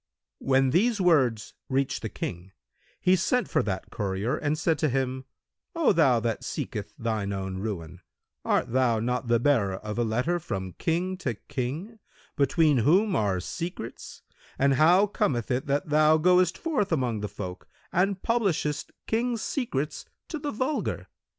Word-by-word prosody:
When 135 -1 +2
these 215 - +2
words 135 - +2 0.2
reached 135 0 0
the - - -4
King, 90 +2 -6 0.5
he 185 - +4
sent 245 +7 +1
for - - +1
that 95 -2 -4
courier 100 +3 -1
and 150 0 -1
said 160 -1 +1
to 155 - +2
him, 130 0 -1 0.5
"O 330 -9 +3
thou 135 -9 +4
that 115 -1 -2
seeketh 105 0 -5
thine 110 -3 -2
own 95 -1 -4
ruin, 90 -4 -5 0.4
art - - +1
thou 120 -3 +2
not 125 +2 -1
the 115 0 +3
bearer 115 -8 +2
of 105 +3 -5
a - - +3
letter 125 +11 0
from 95 - -5
King 180 +3 0
to 130 -11 -3
King, 145 - -5 0.4
between 145 0 +3
whom 185 - +3
are 100 -4 +1
secrets, 165 - -6 0.3
and 140 0 +3
how 170 +8 +5
cometh 130 - -1
it 125 +3 -1
that 145 +2 0
thou 155 +1 +5
goest 180 +2 +3
forth 260 - -1
among 125 -8 0
the 105 0 -4
folk 90 -2 -7 0.3
and 190 +2 +1
publishest 190 -10 0
Kings' 230 0 -1
secrets 155 - -2 0.2
to 315 - -4
the 295 0 -3
vulgar? 260 +5 -2
140 Hz, 155 wpm, -27 LUFS, 110-180 Hz, 0.5 s, how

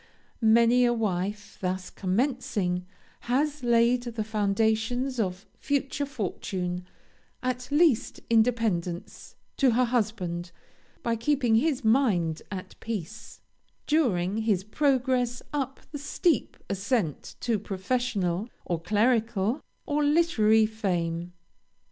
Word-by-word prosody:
Many 235 +2 +5
a 240 -1 +4
wife, 205 -1 -2
thus 185 0 -2
commencing, 195 -4 -1 0.3
has 290 +3 0
laid 235 +1 +4
the 235 -2 -4
foundations 220 +4 0
of 185 -2 -2
future 280 0 -1
fortune, 180 -6 -3 0.6
at 250 0 -2
least 290 -5 +3
independence, 220 -7 0 0.2
to 265 -4 +4
her 250 +2 +3
husband, 195 -8 -1 0.5
by 230 -1 +1
keeping 245 0 +1
his 275 -1 +1
mind 205 - +2
at 190 -2 -6
peace, 215 -2 -6 0.4
during 210 - +1
his 215 -4 +1
progress 255 0 +1
up 270 -2 -2
the 290 - -5
steep 300 - 0
ascent 195 - -1
to 230 -3 +1
professional, 200 -1 -1 0.2
or 170 -2 -2
clerical, 220 - +1 0.2
or 295 0 0
literary 265 -9 +4
fame. 175 -6 -2
225 Hz, 105 wpm, -27 LUFS, 190-255 Hz, 0.6 s, Many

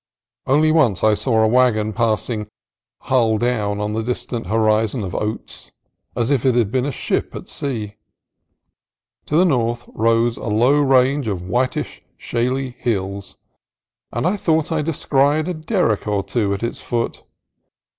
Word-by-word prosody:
Only 155 +4 +4
once 125 - +2
I 110 0 +5
saw 110 +1 +1
a - - +4
wagon 110 -3 +2
passing 110 -1 -1 0.5
"hull 115 -4 +2
down" 105 -4 -1
on 105 +1 -2
the 110 - -1
distant 120 -2 -4
horizon 110 +2 +1
of 90 - -5
oats, 105 +1 -5 0.4
as 120 +3 0
if 135 -5 +2
it 130 -2 +3
had 115 -4 +2
been 130 +2 0
a - - -1
ship - - -2
at - - -8
sea. 110 -7 -5 1.3
To 150 - -1
the 180 - +5
north 120 -6 0
rose 115 +1 +2
a - - -7
low 120 +7 +3
range 135 -1 +3
of 95 -4 -3
whitish 125 +6 -1 0.2
shaly 125 +2 -2
hills, 100 -3 -3 0.7
and - - -2
I 190 +4 +1
thought 160 -4 0
I 160 -1 +1
descried 150 0 +1
a 180 - -1
derrick 155 - 0
or 100 -2 0
two 100 +1 -1
at 100 - -7
its 115 - -3
foot. 115 -1 -3
120 Hz, 155 wpm, -20 LUFS, 110-135 Hz, 1.3 s, I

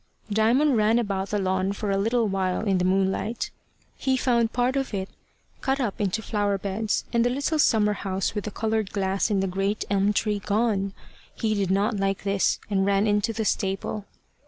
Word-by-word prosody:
Diamond 240 +6 +3
ran 215 +2 +3
about 200 -4 -1
the 210 - 0
lawn 190 0 0
for 200 0 -3
a 195 - +1
little 225 +2 +1
while 190 -2 0
in 195 -4 +1
the 180 - +1
moonlight. 195 +4 0 0.4
He 265 -1 0
found 235 -3 +2
part 250 +2 +1
of 270 -5 -1
it 190 0 -3 0.5
cut 270 +1 0
up 225 -5 -2
into 205 +2 -1
flower 205 -2 0
beds, 205 +2 -2
and 235 0 +3
the 245 - +2
little 285 +5 -1
summer 210 -6 +4
house 195 -2 -2
with 210 -1 -3
the - - -2
coloured 220 -1 -1
glass 195 0 0
and 195 -2 +1
the - - 0
great 195 +3 -1
elm 200 +1 +3
tree 210 0 0
gone. 200 -1 0 0.4
He 220 -1 0
did 200 -3 0
not 200 +3 +1
like 195 0 -1
this, 200 -1 +1
and 195 -2 +1
ran 200 +1 +2
into 210 +1 +1
the 225 -1 -3
stable. 195 +1 -1
205 Hz, 195 wpm, -25 LUFS, 195-225 Hz, 0.5 s, summer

